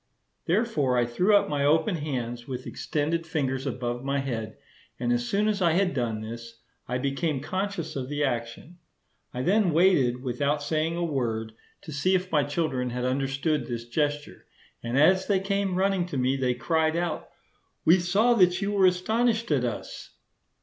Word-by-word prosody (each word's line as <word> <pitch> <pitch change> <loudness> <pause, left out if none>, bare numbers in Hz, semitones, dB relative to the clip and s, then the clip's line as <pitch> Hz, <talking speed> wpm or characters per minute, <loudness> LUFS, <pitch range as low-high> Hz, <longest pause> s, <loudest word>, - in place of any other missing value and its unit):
Therefore 165 - +1
I 120 - +3
threw 180 - +2
up 200 - +4
my 145 -1 -1
open 160 +6 +2
hands 120 -5 -4
with 130 -1 -5
extended 165 +3 -2
fingers 135 -4 -2
above 120 -1 -3
my 140 +1 -1
head; 115 -6 -4 0.4
and 120 0 +1
as 120 0 -1
soon 205 +2 +1
as 210 -2 0
I 170 -3 +3
had 185 +1 +2
done 115 -4 -2
this, 115 +1 -8 0.3
I 125 - -1
became 140 +3 -1
conscious 180 +2 -3
of 130 -1 -4
the 145 0 -1
action. 120 +6 -4 0.5
I 125 - -4
then 195 +2 +3
waited, 145 -8 +3
without 140 +3 -1
saying 160 +2 0
a 175 - -1
word, 115 -7 -2 0.3
to 155 - -8
see 185 +7 +1
if 185 0 -2
my 150 -3 +3
children 145 -4 -1
had 125 +1 -3
understood 135 +1 -1
this 120 -1 -5
gesture; 145 +3 -2 0.3
and 120 +2 -2
as 185 +6 +4
they 200 -2 +3
came 195 -1 -1
running 190 -1 +1
to 170 - -4
me 130 +1 +1
they 130 -2 0
cried 160 +5 +1
out, 170 -2 -2 0.6
"We 175 +4 +6
saw 200 +8 +3
that 180 -5 +4
you 200 +1 -1
were 195 -2 +4
astonished 220 +4 +1
at 135 -4 +2
us." 120 -3 -5
145 Hz, 175 wpm, -26 LUFS, 125-180 Hz, 0.6 s, We